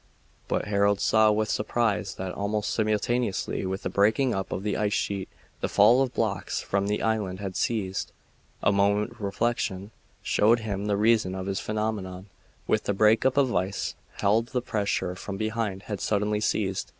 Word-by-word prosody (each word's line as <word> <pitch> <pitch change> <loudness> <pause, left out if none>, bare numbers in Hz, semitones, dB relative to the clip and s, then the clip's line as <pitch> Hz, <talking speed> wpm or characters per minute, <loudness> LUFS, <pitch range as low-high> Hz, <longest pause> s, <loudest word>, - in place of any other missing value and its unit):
But - - -1
Harold 100 0 +2
saw 110 -1 +4
with 110 +1 +1
surprise 105 -2 0
that, 95 -1 -4
almost 105 +1 -2
simultaneously 110 -2 0
with 95 +1 -4
the - - -1
breaking 110 +6 +3
up 95 0 -3
of 95 - -3
the 105 -1 -1
ice 105 -1 0
sheet, 100 -2 -2 0.3
the - - -2
fall 125 +3 +5
of 130 -2 0
blocks 110 -3 -1
from 100 0 -1
the 105 +1 -1
island 105 -4 -1
had 95 -2 -5
ceased. 95 -5 -1 0.5
A - - +4
moment's 105 +3 +1
reflection 100 -1 -1 0.3
showed 115 +3 +3
him 105 -1 -3
the 100 -1 +1
reason 105 -3 +3
of 95 -1 -4
this 95 0 -2
phenomenon. 105 -4 -3 0.4
With 110 - 0
the 100 - +1
break 110 +4 +4
up 130 - -1
of 140 -2 +4
the - - -3
ice 95 +2 -1 0.2
field 110 +4 +2
the 125 0 -2
pressure 100 -5 -1
from 95 +2 -6
behind 110 -2 -2
had 105 -3 -5
suddenly 105 0 0
ceased. 100 -3 -1
105 Hz, 175 wpm, -27 LUFS, 100-110 Hz, 0.5 s, fall